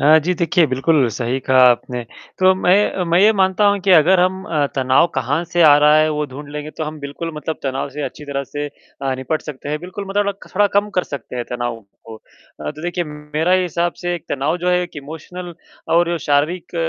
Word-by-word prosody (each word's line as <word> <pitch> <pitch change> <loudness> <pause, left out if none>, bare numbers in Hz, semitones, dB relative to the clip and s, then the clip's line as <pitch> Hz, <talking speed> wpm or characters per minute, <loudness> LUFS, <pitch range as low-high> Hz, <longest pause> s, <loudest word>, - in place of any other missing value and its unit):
अ, 155 +2 +6
जी, 180 - +1
देखिए 170 0 +3
बिल्कुल 135 +1 +2
सही 120 +4 -2
कहा 130 0 +5
आपने। 120 0 -2 0.4
तो 185 0 +5
मैं 190 0 +2
मैं 170 - +4
ये 215 +2 +6
मानता 190 0 +2
हूँ 200 0 +3
कि - - +4
अगर 180 +3 +5
हम 190 +1 0
अ, 150 -3 0
तनाव 130 +4 +3
कहाँ 135 +5 0
से 175 0 +1
आ 145 -2 +8
रहा 150 +1 +5
है 155 0 +4
वो 150 0 -1
ढूँढ 145 +2 -10
लेंगे 150 +1 -6
तो 155 - -5
हम 155 0 -6
बिल्कुल 145 +4 -6
मतलब 155 +1 -4
तनाव 135 0 -2
से 150 +2 -6
अच्छी 150 - -6
तरह 140 -1 -3
से 145 +2 -5
अ, 135 -1 -6
निपट 130 +4 -3
सकते 145 -2 -8
हैं, 150 +1 -2
बिल्कुल 185 +3 -7
म - - -5
तोला 200 0 +1
ख - - -15
थोड़ा 205 +1 +4
कम 205 +1 +2
कर 180 - +2
सकते 125 -2 -7
हैं 120 - -3
तनाव 120 -2 -3 0.2
को। 115 - -10
अ, - - -11
तो 155 +1 -11
देखिए 175 0 -2
मेरा 150 +3 -2
हिसाब 175 -2 +1
से 175 0 -1
एक 170 - -7
तनाव 145 +5 -1
जो 180 - -2
है 180 0 +3
एक 175 -2 -8
इमोशनल 165 +4 -8 0.4
और 170 0 +2
शारीरिक 155 +5 -1
155 Hz, 225 wpm, -19 LUFS, 140-180 Hz, 0.4 s, आ